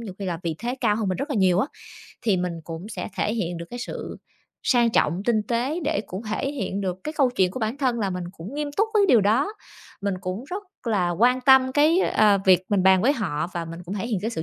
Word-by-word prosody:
nhiều 205 -5 -7
khi 200 - -5
là 170 -3 -2
vị 165 -2 -2
thế 240 +2 -3
cao 215 -4 +2
hơn 215 -4 -1
mình 185 - -1
rất 290 - -4
là 270 - -1
nhiều 185 -2 +3
á 220 - +2 0.6
thì 215 -5 +2
mình 180 -1 -1
cũng 165 +3 -7
sẽ - - -5
thể 215 - 0
hiện 175 -6 -2
được 170 0 -7
cái 245 - -6
sự 245 - -6 0.5
sang 240 -3 +3
trọng, 175 -1 +1
tinh 220 -3 +2
tế 250 - -1
để 310 +1 0
cũng 190 +5 -6
thể 220 +5 -2
hiện 200 -7 -3
được 185 -2 -2
cái 305 - -4
câu 270 -4 +3
chuyện 185 -1 +3
của 255 - -6
bản 220 +4 -1
thân 250 -4 +1
là 200 -3 -1
mình 180 -1 -4
cũng 195 +10 -9
nghiêm 295 -1 -2
túc 430 +2 +2
với 410 -2 +5
điều 235 -4 +6
đó, 235 - +2 0.5
mình 200 -1 -1
cũng 185 +6 -4
rất 395 +3 -4 0.2
là 190 -6 +1
quan 245 +8 +3
tâm 260 0 +5
cái, 310 +5 +4
ờ, 210 - +4
việc 185 -1 +5
mình 200 -3 +2
bàn 190 -1 +5
với 275 +4 +4
họ 170 - -2
và 170 - -2
mình 165 +1 -8
cũng 190 +4 -5
thể 210 +3 -3
hiện 220 -6 -1
cái 225 - -1
sự 160 -8 -4
215 Hz, 265 wpm, -24 LUFS, 185-255 Hz, 0.6 s, điều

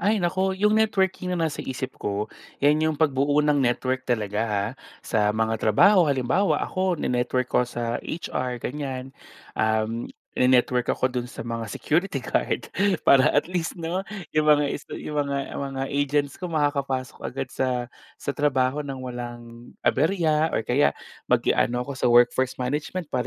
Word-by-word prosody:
Ay, 210 +3 +2
naku! 190 +1 0
Yung 210 +2 +3
networking 190 -4 +1
naman 165 -3 0
sa - - -5
isip 130 0 -4
ko, 105 +1 -1 0.4
'yan 150 +2 +4
yung 155 - -2
pagbuo 145 -1 +2
ng 145 -2 +3
network 130 +1 0
talaga, 105 -3 0
ha, 100 -1 0 0.4
sa 105 -2 +1
mga 110 0 0
trabaho. 175 - +5
Halimbawa 140 +9 +1
ako, 185 -2 0
ni-network 125 -1 0
ko 125 - +4
sa 120 -1 -3
HR 125 -6 -3
ganyan, 135 -2 -5 0.4
um, 110 +1 0 0.3
ine-network 125 -1 +3
ako 130 - 0
dun 125 -1 -2
sa - - -7
mga 115 -1 -4
security 155 - -1
guard - - -1 0.3
para 135 -1 +6
at 145 - +4
least 175 -2 -2
'no, 170 +3 -2 0.3
yung 155 0 +2
mga 150 -1 +5 0.2
sta - - -9
yung 150 -1 -2
mga 140 -1 -3
mga 135 -1 -3
agents 145 0 0
ko 180 - -3
makakapasok 140 -5 -1
agad 135 0 -4
sa 125 -2 -1 0.3
sa - - -4
trabaho 135 -1 +1
ng 140 -2 -5
walang 120 -1 -8
aberya 160 0 +2
or - - +1
kaya 135 +4 +2 0.3
mag-i - - +3
ano 125 +1 +1
ako 140 - -5
sa - - +1
workforce 120 +2 +4
management 150 +5 -3
para 125 -2 0
135 Hz, 160 wpm, -25 LUFS, 125-155 Hz, 0.4 s, para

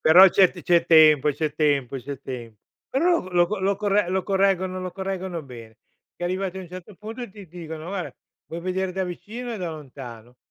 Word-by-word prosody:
Però 180 +5 +8
c'è 185 0 +5
t 175 - -11
c'è 175 -1 +3
tempo, 155 -3 +6
c'è 150 +1 -2
tempo, 140 -4 +1
c'è 140 +2 -7
tempo. 120 -5 -8 0.3
Però 340 +6 +2
lo - - -12
lo 175 -1 +4
co 210 +4 -3
lo 195 +1 +1
corre 205 -2 +1
lo 190 +1 0
correggono 190 -1 +1
lo 185 - -4
correggono 190 -3 -4
bene. 115 -4 -12 0.4
E 175 - -5
arrivati 185 +1 -2
a - - -5
un 180 - -10
certo 185 +3 -10
punto 225 +5 -7
ti 200 0 -12
dicono: 160 -1 -8
"Guarda 190 -2 -4 0.3
vuoi 165 - -5
vedere 185 0 -1
da 190 0 -1
vicino 225 +7 -6
e 225 - -5
da 180 -3 -3
lontano?" 125 -6 -10
180 Hz, 205 wpm, -24 LUFS, 150-195 Hz, 0.4 s, Però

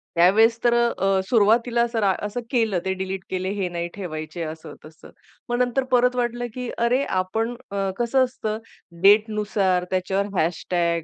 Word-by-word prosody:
त्यावेळेस 220 +7 +5
तर 240 -1 +4
अ, 195 -5 +2
सुरुवातीला 235 +2 +3
असं 230 -1 -2
रा 195 -1 +3
असं 210 +4 -4
केलं, 225 -7 +1
ते 190 - 0
डिलीट 190 0 -4
केले, 185 0 -2
हे 190 -3 -2
नाही 170 0 -3
ठेवायचे, 155 -3 -5
असं 160 0 -7
तसं. 155 0 -15 0.4
मग 240 - 0
नंतर 250 +2 +1
परत 250 0 +3
वाटलं, 240 0 -1
की 250 -1 -5
अरे 245 +4 +2
आपण, 220 +5 -1 0.2
अ, 195 -1 -1
कसं 245 +2 +2
असतं, 220 -4 -4 0.5
डेटनुसार 205 -3 +3
त्याच्यावर 190 +2 0
हॅशटॅग 170 0 0
205 Hz, 160 wpm, -23 LUFS, 185-235 Hz, 0.5 s, त्यावेळेस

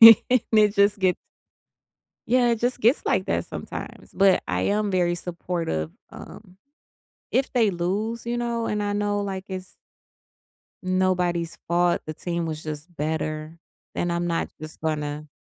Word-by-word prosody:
And 230 +2 +9
it 210 -1 +5
just 200 +1 +4
gets 185 -2 +3 1.1
Yeah. 245 +1 +4
It 230 - +1
just 245 +2 0
gets 240 +5 +3
like - - +2
that - - 0
sometimes, - - -7
but 195 -1 +5
I 90 0 0
am 205 - +1
very 175 -2 +2
supportive. 170 - -3 0.2
Um, 180 - -12 0.7
if 270 - +1
they 230 -5 +3
lose, 205 +7 -2
you 240 0 -1
know, 235 -1 -1
and 210 0 -1
I 205 0 -1
know, 205 0 0
like, 195 -2 -3
it's 185 0 -6 1.1
nobody's 180 -2 +1
fault, 175 0 +2
the 155 - -4
team 170 +1 -3
was 155 -1 -4
just 155 +3 -6
better, 155 +1 -3 0.4
then 175 - -1
I'm 170 0 0
not 165 -1 -1
just 155 0 -8
gonna 150 -1 -2
185 Hz, 150 wpm, -25 LUFS, 165-210 Hz, 1.1 s, And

